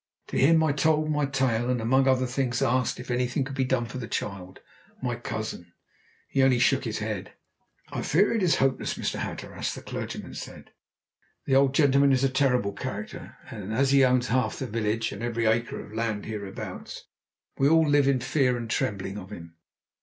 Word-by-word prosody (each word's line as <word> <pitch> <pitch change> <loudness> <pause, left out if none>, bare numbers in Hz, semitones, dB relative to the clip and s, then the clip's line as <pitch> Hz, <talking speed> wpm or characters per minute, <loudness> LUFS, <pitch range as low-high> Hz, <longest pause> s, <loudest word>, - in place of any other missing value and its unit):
To - - -6
him 160 +4 +5
I 155 - +3
told 155 +1 +2
my 150 -2 +1
tale, 130 -3 0
and, 125 -1 +1
among 130 +4 +2
other 130 -1 +3
things, 125 -2 -1
asked 125 0 +1
if 125 0 -6
anything 125 +2 0
could 135 +1 -6
be 135 - +1
done 130 -2 0
for 130 +2 -7
the 115 - -5
child 95 -4 -5 0.4
my 125 -2 -2
cousin. 110 -7 -6 0.5
He 135 - +1
only 130 -2 +4
shook 130 +2 +2
his 110 -2 -2
head. 105 -3 -4 0.6
"I - - -3
fear 195 +9 +3
it 225 - 0
is 180 -3 +3
hopeless, 135 -1 0
Mr. - - -3
Hatteras," - - -4
the - - -9
clergyman - - -6
said. - - -9 0.7
"The 135 - 0
old 135 0 +4
gentleman 140 -1 +4
is 130 0 +2
a 135 - +4
terrible 125 -6 +1
character, - - -7
and 105 0 -6
as 135 +4 +2
he 140 -1 +6
owns 125 -1 +3
half 125 -3 +1
the 130 - -3
village, 115 -1 -1
and 100 - -7
every 115 -1 -1
acre 115 +2 +1
of - - -10
the - - -10
land 110 -2 -2
hereabouts, 100 -3 -7 0.6
we 135 +1 +4
all 160 0 +5
live 145 -1 +4
in 135 -2 +2
fear 125 -1 +1
and 115 -1 -5
trembling 100 -1 -2
of 95 -1 -10
him. 85 -4 -9
125 Hz, 200 wpm, -27 LUFS, 110-135 Hz, 0.7 s, he